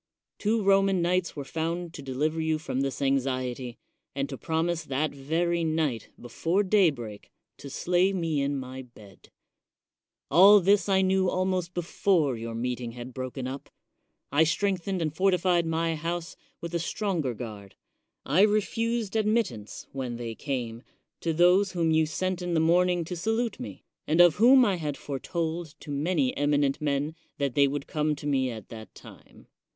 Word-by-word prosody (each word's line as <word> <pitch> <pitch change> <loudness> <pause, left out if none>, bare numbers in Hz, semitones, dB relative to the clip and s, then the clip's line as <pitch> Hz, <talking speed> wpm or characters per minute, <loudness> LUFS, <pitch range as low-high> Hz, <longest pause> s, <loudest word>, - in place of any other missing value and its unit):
Two 215 +1 +1
Roman 195 -1 +4
knights 180 0 0
were 140 -2 -5
found 165 +2 -3
to - - -8
deliver 150 +4 -1
you 160 0 +1
from 145 -4 -3
this 135 +1 -2
anxiety, 130 -2 -1 0.4
and 140 0 -1
to 135 - -5
promise 165 +3 -1
that 145 +2 -1
very 165 +5 -1
night, 155 -7 -1
before 165 - 0
daybreak, 150 - +1 0.3
to 140 - -9
slay 180 +6 +1
me 165 -6 -1
in 140 0 -1
my 130 0 -6
bed. 110 -6 -17 1.0
All 195 +7 +8
this 200 +2 +3
I 190 -1 +4
knew 190 0 +2
almost 185 -1 -1
before 170 -4 +1
your 115 0 -6
meeting 120 0 -3
had 125 +1 -8
broken 130 0 -5
up. 135 +2 -7 0.6
I 145 +3 +5
strengthened 185 +1 0
and 155 -1 -3
fortified 180 -2 +2
my 165 0 0
house 165 +2 -4 0.3
with 170 0 -6
a 170 - 0
stronger 170 - -2
guard; 105 -4 -8 0.5
I 180 - +3
re 210 +1 +5
fused 230 0 -2
admittance, 215 - -1
when 130 -3 -4
they 115 -1 -5
came, 120 -3 -4 0.4
to 165 - -1
those 180 +4 +4
whom 165 -2 +1
you 160 0 +3
sent 185 +3 -2
in 175 -1 -2
the - - +3
morning 175 +1 +3
to 180 - -5
salute 225 +5 -1
me, 100 -3 -8 0.2
and 160 +3 +1
of 175 -1 +7
whom 250 +4 +7
I 195 -4 +1
had 150 -4 -4
foretold 160 +3 -4
to 145 - -8
many 180 - 0
eminent 145 -1 +1
men 145 +1 -1 0.2
that 140 -3 -1
they 140 +1 +4
would 140 0 -3
come 150 0 -1
to 145 - -10
me 135 -3 +1
at 110 -4 -8
that 110 -1 -10
time. - - -15
160 Hz, 165 wpm, -27 LUFS, 135-180 Hz, 1.0 s, All